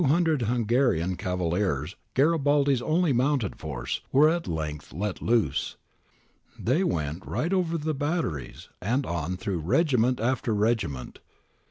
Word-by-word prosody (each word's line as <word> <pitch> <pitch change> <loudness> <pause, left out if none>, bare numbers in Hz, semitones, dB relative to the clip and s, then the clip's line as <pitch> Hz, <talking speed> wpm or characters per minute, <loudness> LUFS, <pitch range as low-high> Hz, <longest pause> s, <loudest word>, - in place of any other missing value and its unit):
The 160 - +3
200 160 -1 +2
Hungarian 115 -6 +1
cavaliers, 90 -2 -1 0.2
Garibaldi's 145 -2 +3
only 160 +2 +2
mounted 130 -3 +1
force, 65 -5 -4
were 150 +3 +6
at 170 +1 -1
length 75 -2 -4
let 100 +4 -3
loose. 115 -2 +1 0.8
They 140 +11 +1
went 80 - -2
right 170 +5 -2
over 170 -3 +1
the 155 0 -2
batteries 145 - -3
and 125 +8 0
on 85 +2 -3
through 90 -1 -2
regiment 125 - +2
after 120 -1 0
regiment. 105 - -1
120 Hz, 130 wpm, -27 LUFS, 90-145 Hz, 0.8 s, were